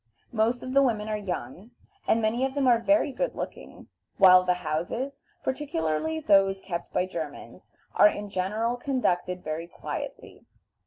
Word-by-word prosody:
Most 230 +2 +1
of 255 - -5
the 275 - +6
women 220 -5 +1
are 215 - 0
young, 185 - -5 0.4
and 225 0 +2
many 230 +4 +1
of 265 +1 -1
them 280 -2 +1
are 240 -2 +5
very 295 +3 +2
good - - -2
looking, - - -8 0.3
while 185 -2 +8
the 180 0 +2
houses, 180 - -3 0.2
particularly 265 - -1
those 195 -7 +3
kept 175 -3 -5
by 180 - +1
Germans, 160 -5 -8 0.2
are 205 - +7
in 205 0 -5
general 210 +6 -1
conducted 185 -9 -1
very 155 +2 -4
quietly. - - -7
210 Hz, 155 wpm, -27 LUFS, 180-255 Hz, 0.4 s, while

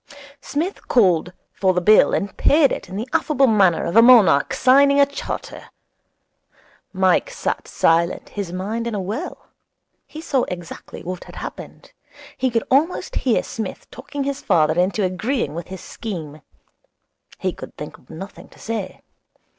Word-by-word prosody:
Psmith 330 +10 -4
called 180 -7 +3 0.2
for 190 -2 +1
the - - +3
bill 210 +4 +5
and 200 - -2
paid 290 -2 +4
it - - -5
in 185 - -7
the 220 +5 -4
affable 280 -3 +2
manner 195 -8 +3
of 170 - -3
a 230 - +9
monarch 230 - +6
signing 280 +2 +4
a 280 - +7
charter. 280 0 -6 1.3
Mike 190 - +2
sat - - -3
silent, 170 +2 +1
his 200 -4 -5
mind 210 +6 -3
in 230 - -3
a - - -2
whirl. 210 - -6 0.6
He 310 - -10
saw 280 -5 0
exactly 175 -2 -8
what 180 0 -6
had - - -13
happened. - - -9 0.4
He 260 - 0
could 230 -2 0
almost 305 +7 +1
hear 250 -4 +1
Psmith 220 -5 -7
talking 280 +2 -6
his 280 0 -3
father 160 -5 +3
into 195 +3 +1
agreeing 190 - -1
with 170 +1 -6
his 190 -1 -8
scheme. 160 -9 -7 1.0
He - - -2
could - - -11
think - - -8
of - - -27
nothing 195 +5 -10
to - - -20
say. 220 -5 -5
210 Hz, 160 wpm, -21 LUFS, 180-265 Hz, 1.3 s, a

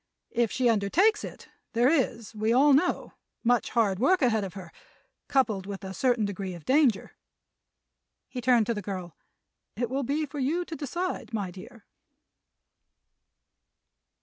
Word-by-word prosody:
If 235 -2 +1
she 250 0 +1
undertakes 295 - +3
it - - -9 0.2
there 235 +2 +3
is, 245 -7 0
we 215 +1 0
all 275 +4 +5
know, 295 +7 +1 0.3
much 245 0 +2
hard 205 -5 +1
work 290 +6 +3
ahead 220 -4 +2
of 195 0 -6
her, 180 -4 -9 0.6
coupled 220 -9 +1
with 200 -1 -6
a 190 0 -6
certain 240 +1 +1
degree 195 -2 -4
of 170 - -12
danger." 265 -6 +2 1.2
He 250 - -6
turned 240 -2 +4
to 235 - 0
the 210 - -4
girl. 185 -4 -6 0.6
"It 240 +1 -2
will 270 +1 0
be 290 +4 -1
for 290 0 -7
you 320 +7 0
to 330 - -6
decide, 320 -3 -4
my 200 -4 -3
dear." 215 +5 -13
235 Hz, 150 wpm, -27 LUFS, 200-275 Hz, 1.2 s, all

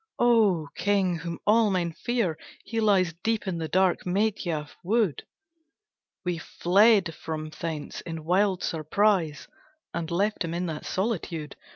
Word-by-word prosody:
"O 215 -10 +3
King, 195 -4 +1
whom 170 0 -5
all 220 0 +4
men 180 -3 0
fear, 230 -4 -1 0.3
he 230 - -2
lies 190 -5 +3
Deep 225 -1 0
in 175 -3 -2
the 160 - -2
dark 185 +1 +2
Medhya 180 -5 -1 0.2
wood, 205 - 0 1.0
We 175 -2 -1
fled 195 +1 +3
from 155 0 -5
thence 155 -2 -5
in 165 -2 -6
wild 185 +1 +2
surprise, 165 0 +1 0.5
And 170 -1 -3
left 200 +5 0
him 165 0 -3
in 180 +1 -1
that 160 -3 -5
solitude. 180 -7 -2
180 Hz, 140 wpm, -27 LUFS, 165-205 Hz, 1.0 s, all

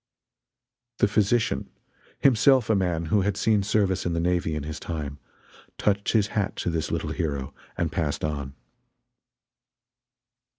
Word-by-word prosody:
The - - +4
physician 105 +2 +1 0.5
himself 130 -2 +4
a - - +4
man 90 -4 0
who 105 - +5
had 100 0 0
seen 110 -2 +3
service 100 -2 +1
in 85 - -1
the 85 - 0
navy 85 -2 0
in 75 - -3
his 80 +2 -5
time 75 -4 -5 0.6
touched 100 -1 +1
his 105 -3 +3
hat 105 -2 -1
to 85 - -2
this 80 -1 -2
little - - -2
hero, 70 -3 -3 0.2
and - - 0
passed 75 -3 -2
on. 70 -3 -4
90 Hz, 140 wpm, -26 LUFS, 80-105 Hz, 0.6 s, who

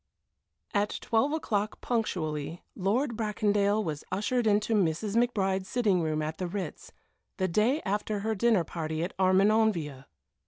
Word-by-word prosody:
VII 205 - +3
At 210 - -2
twelve 230 +6 +1
o'clock 215 -9 -1
punctually 165 -9 -2
Lord 235 +7 0
Bracondale 210 -1 +1
was 155 -5 -4
ushered 220 +5 0
into 210 +2 +2
Mrs. 200 +1 +1
McBride's 195 -5 +1
sitting 205 -6 +2
room 155 -1 -1
at 155 +1 -4
the 180 - -2
Ritz, 180 -3 -6 0.5
the 185 - +1
day 220 - +2
after 205 +1 -1
her 220 +2 0
dinner 215 -3 +3
party 160 -1 -3
at 180 - -4
Armenonville. 185 -7 +2
200 Hz, 145 wpm, -29 LUFS, 175-220 Hz, 0.5 s, VII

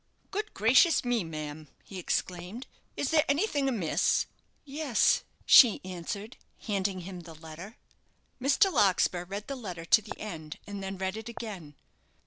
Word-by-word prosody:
"Good 425 +2 -4
gracious 255 - +4
me, 240 -4 +1
ma'am!" 155 -1 -7 0.2
he 190 - -8
exclaimed; 180 +6 -3 0.3
"is 285 - -1
there 310 -2 +5
anything 285 -3 +1
amiss?" 200 -11 +1 0.4
"Yes," 280 -3 +2 0.2
she 240 -6 +8
answered, 185 +5 -6 0.2
handing 195 -3 -1
him 180 +1 -8
the 165 -2 -11
letter. 160 +7 -10 0.6
Mr. 285 +8 +3
Larkspur 180 -2 +2
read 200 +3 -6
the 275 - -4
letter 180 -9 -7
to 220 - +5
the 210 - -9
end, 160 -7 -7
and 205 -1 -6
then 195 0 -5
read 190 +2 -3
it 220 +1 -7
again. 195 -11 -8
200 Hz, 145 wpm, -29 LUFS, 175-245 Hz, 0.6 s, she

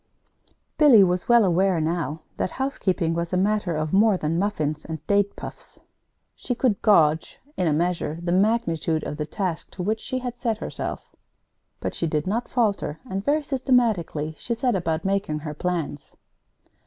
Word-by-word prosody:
Billy 265 -9 +8
was 180 +2 0
well 235 -3 +6
aware 185 0 +2
now 160 -1 -2 0.2
that - - -1
housekeeping 190 -11 -1
was 170 0 -2
a - - +3
matter 195 -3 +1
of 155 0 -2
more 205 0 +5
than 165 0 -1
muffins 155 -7 -1
and 160 -1 -7
date 200 0 +2
puffs. - - -10 0.6
She 245 - -3
could 235 -5 +1
gauge, 160 -7 +3 0.2
in 180 - 0
a - - +3
measure, 165 0 0
the 175 0 -2
magnitude 175 -6 +1
of 150 - -5
the 150 -1 -3
task 180 -1 -3
to 180 - -4
which 215 +4 0
she 255 - -4
had 245 -1 -4
set 230 -3 -1
herself. - - -6 0.6
But - - -3
she 170 - -2
did 150 -1 -1
not 225 +6 -2
falter; 205 - 0
and 195 -3 -3
very 295 +4 +1
systematically 230 - 0
she 235 - -2
set 245 0 +1
about 165 -1 -1
making 195 -5 0
her 150 -1 -5
plans. 165 -3 -4
185 Hz, 170 wpm, -24 LUFS, 160-220 Hz, 0.6 s, Billy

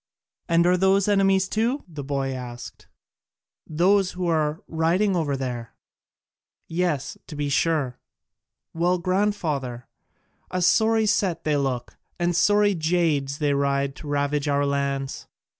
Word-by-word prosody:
"And 170 0 +4
are 180 +1 +4
those 190 +1 +3
enemies 195 -2 +3
too?" 230 +7 -1
the 150 -5 -7
boy 135 -1 -2
asked, 120 -2 -8 0.8
"those 185 +4 +2
who 180 0 -3
are 155 -2 0
riding 175 +5 +1
over 145 -5 0
there?" 120 -3 -5 0.9
"Yes, 165 -5 -2
to 150 - -8
be 145 0 -2
sure." 140 -3 0 0.7
"Well, 175 +2 +1
grandfather, 170 - -1 0.6
a 185 -1 -1
sorry 220 +3 +3
set 200 -5 0
they 155 -1 +1
look, 135 -4 -2 0.2
and 175 0 0
sorry 205 +3 +4
jades 160 -5 0
they 145 -2 +1
ride 140 0 0
to 150 - -9
ravage 145 0 0
our 145 0 +2
lands! 140 -1 -2
160 Hz, 130 wpm, -24 LUFS, 140-185 Hz, 0.9 s, And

